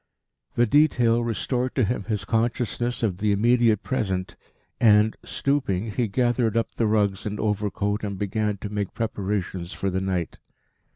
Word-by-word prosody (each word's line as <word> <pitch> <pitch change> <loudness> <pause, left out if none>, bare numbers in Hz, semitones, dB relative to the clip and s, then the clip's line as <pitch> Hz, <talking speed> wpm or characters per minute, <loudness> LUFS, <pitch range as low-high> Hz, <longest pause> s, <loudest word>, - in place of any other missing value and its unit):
The 120 - +4
detail 120 -3 +3
restored 125 +2 -2
to 130 - +2
him 105 -2 -1
his 105 -2 -2
consciousness 120 +1 -1
of 95 -5 0
the 105 0 +1
immediate 115 +1 +3
present, 95 -8 -2 0.4
and, 105 -1 +5
stooping, 115 -8 -1
he 120 +2 0
gathered 120 +1 +1
up 115 - 0
the 115 - 0
rugs 105 -2 +1
and 105 0 -4
overcoat 105 0 -1
and 100 -2 -3
began 105 +1 -1
to 105 - -4
make 105 -2 -3
preparations 95 -5 -3
for 95 - -2
the 95 +1 -1
night. 95 -3 -2
105 Hz, 155 wpm, -25 LUFS, 100-120 Hz, 0.4 s, and